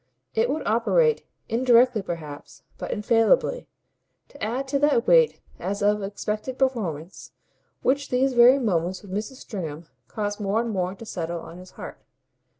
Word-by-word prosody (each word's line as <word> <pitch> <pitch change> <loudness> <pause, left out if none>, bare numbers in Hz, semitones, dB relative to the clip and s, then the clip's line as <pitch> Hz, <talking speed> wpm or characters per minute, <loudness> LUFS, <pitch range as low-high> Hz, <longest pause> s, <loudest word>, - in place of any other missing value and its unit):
It 225 +2 +1
would 300 +3 -2
operate, 445 - +2 0.2
indirectly 240 -1 +4
perhaps, 150 -5 -8 0.2
but - - -5
infallibly, 225 - +2 0.6
to 285 - -11
add 250 +5 -2
to 280 0 +1
that 280 -4 +3
weight - - +4 0.2
as 200 +1 -3
of 210 0 +2
expected 210 +5 -4
performance 195 - -2 0.5
which 280 +1 +1
these 260 +1 +2
very 245 +2 +7
moments 185 -7 -1
with 200 - -11
Mrs. 210 +7 -4
Stringham 170 - -6 0.2
caused 205 -1 -3
more 205 +1 0
and 235 0 -1
more 185 -1 -2
to 230 - -11
settle 170 -4 -4
on 170 +2 -11
his 185 0 -12
heart. - - -8
220 Hz, 150 wpm, -25 LUFS, 185-260 Hz, 0.6 s, very